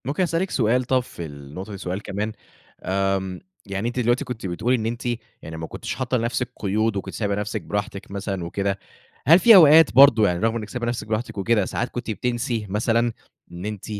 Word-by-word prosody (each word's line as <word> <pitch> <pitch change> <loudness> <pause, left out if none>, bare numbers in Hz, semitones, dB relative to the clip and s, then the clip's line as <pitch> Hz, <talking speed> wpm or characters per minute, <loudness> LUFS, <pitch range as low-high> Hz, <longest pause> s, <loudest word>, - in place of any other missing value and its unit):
ممكن 145 +8 0
أسألِك 175 +2 0
سؤال 125 +1 +2
طب 130 +1 +2
في 105 -8 -7
النقطة 75 +7 -9
دي 100 - -6
سؤال 90 +1 -4
كمان 105 +1 -3 0.7
آمم 95 -1 -1 0.3
يعني 100 +2 -3
أنتِ 120 +1 -3
دلوقتي 120 +4 +1
كنتِ 120 -4 -6
بتقولي 95 +8 0
إن 110 -3 -2
أنتِ 120 +2 -4 0.4
يعني 80 0 -8
ما 80 0 -5
كنتيش - - -5
حاطة 130 0 -1
لنفسِك 120 +1 -1
قيود 110 +2 0
وكنتِ 95 - -5
سايبة 100 -2 -1
نفسِك 105 0 -3
براحتِك 100 -1 -4
مثلًا 100 -2 -4
وكده. 100 +3 -2 0.5
هل 165 +4 +8
في 225 +4 +8
أوقات 160 -3 +8
برضه 120 -5 +7
يعني، 90 -1 0
رغم 115 +2 +1
إنِك 110 -2 -5
سايبة 125 -1 -4
نفسِك 120 -3 -3
براحتِك 110 +1 -3
وكده، 105 +1 +2
ساعات 120 - -2
كنتِ 120 -2 -5
بتنسي 120 +1 -2
مثلًا 115 +3 +1 0.4
إن 85 +2 -7
أنتِ 105 -2 -5
110 Hz, 195 wpm, -23 LUFS, 100-125 Hz, 0.7 s, هل